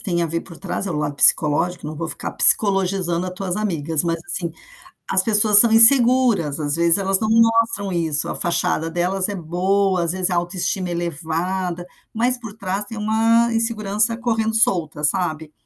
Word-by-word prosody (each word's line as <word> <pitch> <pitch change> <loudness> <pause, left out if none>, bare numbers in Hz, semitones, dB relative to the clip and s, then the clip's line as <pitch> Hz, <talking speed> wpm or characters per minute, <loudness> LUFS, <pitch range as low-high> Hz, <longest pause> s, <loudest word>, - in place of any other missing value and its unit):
tem 175 -3 -2
a - - -1
ver 165 +1 -4
por 170 - -13
trás 195 +1 -5
é - - -4
o 160 - -4
lado 150 -1 -3
psicológico, 165 +4 +2
não 155 +1 -7
vou 165 +1 -5
ficar 155 - -5
pscicologizando 190 -3 +1
a - - -5
tuas 185 0 -5
amigas, 165 -7 -2
mas, 165 0 -2
assim, 170 -2 -4 0.6
as 185 - +3
pessoas 210 0 +5
são 230 +1 +6
inseguras, 230 - +4
às 145 0 0
vezes, 170 +2 +3
elas 195 0 0
não 220 - -2
mostram 225 -3 +1
isso, 160 -4 -1
a - - -4
fachada 165 -1 -2
delas 185 +3 -2
é 205 - -5
boa, 185 +2 -1
às 170 - -1
vezes, 185 0 -1
a 180 - -1
autoestima 180 +1 -2
elevada, 175 +2 -4 0.3
mas 245 +3 0
por 225 -4 -10
trás 200 -1 -4
tem 225 +2 -9
uma 225 +2 +1
insegurança 225 -1 0
correndo 225 -2 -2
solta, 165 -9 0
sabe. 155 -1 -1
185 Hz, 180 wpm, -19 LUFS, 170-215 Hz, 0.6 s, são